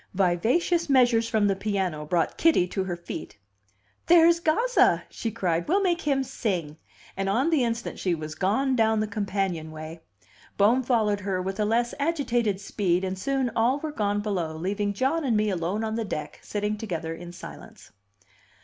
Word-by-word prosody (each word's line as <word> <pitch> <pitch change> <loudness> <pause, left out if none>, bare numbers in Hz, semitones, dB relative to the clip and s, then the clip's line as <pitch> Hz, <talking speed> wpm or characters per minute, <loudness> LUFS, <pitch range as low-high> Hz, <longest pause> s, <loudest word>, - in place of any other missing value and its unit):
Vivacious 230 - +1
measures 240 -4 +4
from 215 -2 +2
the 200 -1 +2
piano 190 -6 -2
brought 170 0 0
Kitty 320 - +4
to 190 - -2
her 175 -2 -3
feet. 170 -8 -8 0.7
"There's 340 0 +6
Gazza!" 460 +11 +3
she 230 - -3
cried. 175 -6 -1
"We'll 390 +6 +2
make 345 -2 +1
him 275 -2 +1
sing!" 175 - -3 0.4
And 195 0 -1
on 255 +11 +1
the 300 -6 +3
instant 230 -1 -3
she 180 -3 0
was 155 -1 -6
gone 220 +11 +1
down 220 -2 +2
the 215 - +1
companionway. 170 -6 -4 0.6
Bohm 225 +6 +4
followed 220 -5 +1
her 195 -2 -2
with 190 +2 -4
a 210 - +2
less 235 +3 +1
agitated 245 - 0
speed, 190 -3 0
and 190 0 -2
soon 265 +2 0
all 240 +4 +2
were 305 +1 -5
gone 205 -6 -1
below, 175 -7 -2
leaving 200 +4 -1
John 270 +10 0
and 240 -6 +1
me 210 0 +1
alone 185 +4 -2
on 220 0 -2
the 230 0 -1
deck, 155 -7 -5
sitting 210 0 -3
together 165 -7 -4
in 175 +1 -9
silence. 175 - -12
210 Hz, 175 wpm, -26 LUFS, 185-250 Hz, 0.7 s, There's